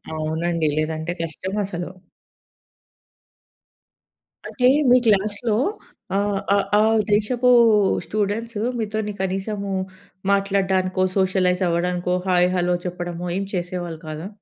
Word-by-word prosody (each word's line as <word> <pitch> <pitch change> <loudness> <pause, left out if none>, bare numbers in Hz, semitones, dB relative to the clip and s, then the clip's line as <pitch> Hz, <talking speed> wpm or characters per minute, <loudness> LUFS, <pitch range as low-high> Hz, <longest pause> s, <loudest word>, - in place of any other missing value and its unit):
అవునండి. 160 +1 -1
లేదంటే 155 +2 -2
కష్టం 165 +4 -5
అసలు. 175 -2 -5 2.6
అంటే 250 -2 +1 0.2
మీ 250 - +7
క్లాస్‌లో, 210 +1 +1 0.6
ఆహ్, 200 -1 0
ఆహ్, 200 - +1
ఆ - - +4 0.3
దేశపు 235 +4 +2 0.6
స్టూడెంట్స్ 215 +2 -2 0.2
మీతోని 215 -1 -2
కనీసము 195 +1 -3 0.6
మాట్లాడ్డానికో, 190 -2 +1
సోషలైజ్ 185 -1 +2
అవ్వడానికో, 180 +1 0
హాయ్, 180 -1 +3
హెల్లో 180 0 +1
చెప్పడమో 175 -1 -4
ఏం 195 - -2
చేసేవాళ్ళు 175 -2 -4
కాదా? 155 +3 -5
185 Hz, 95 wpm, -22 LUFS, 175-205 Hz, 2.6 s, మీ